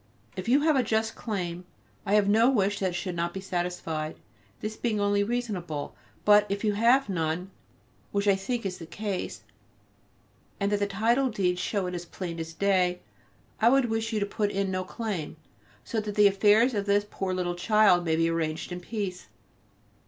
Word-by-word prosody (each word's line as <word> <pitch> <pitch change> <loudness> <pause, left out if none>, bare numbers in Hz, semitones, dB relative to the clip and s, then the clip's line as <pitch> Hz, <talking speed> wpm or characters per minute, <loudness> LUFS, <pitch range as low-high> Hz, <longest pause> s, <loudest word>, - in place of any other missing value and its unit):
If 185 +4 -4
you 275 +4 +5
have 310 0 +3
a 265 - +4
just 220 -1 0
claim 180 -5 -4 0.4
I 200 - +3
have 205 -1 +4
no 225 +4 +5
wish 205 -5 +1
that 190 - +1
it - - -6
should 180 +1 -3
not 170 +1 -2
be - - -3
satisfied, 175 -4 -3 0.4
this 215 +1 -4
being 220 -3 -1
only 205 0 +2
reasonable; 200 -10 -3 0.3
but 210 0 +6
if 200 +2 -2
you 210 -1 +2
have 240 +6 +4
none, 175 0 -2 0.6
which 200 0 0
I 200 - +5
think 230 +4 -3
is 185 -2 -3
the 165 - -9
case, 200 +1 -4 1.2
and 200 0 0
that 205 - +1
the 205 - +1
title 230 +7 +2
deeds 180 -5 0
show 200 -1 -1
it 180 - -4
as 175 -1 -5
plain 170 -1 -6
as 165 0 -6
day, 185 -2 +2 0.6
I 225 - +6
would 260 -2 +3
wish 225 0 -1
you 220 - 0
to 200 - 0
put 205 0 -1
in 195 -1 -1
no 185 0 -1
claim, 190 -5 -4 0.5
so 230 - -2
that 210 -1 -5
the 210 -1 +5
affairs 210 +5 +5
of 200 -2 -2
this 205 0 +3
poor 195 -2 -3
little 180 -1 -1
child 185 0 +4
may 160 -2 +1
be 165 0 +2
arranged 165 0 -2
in 175 - -4
peace. 190 -1 -5
200 Hz, 195 wpm, -27 LUFS, 180-215 Hz, 1.2 s, but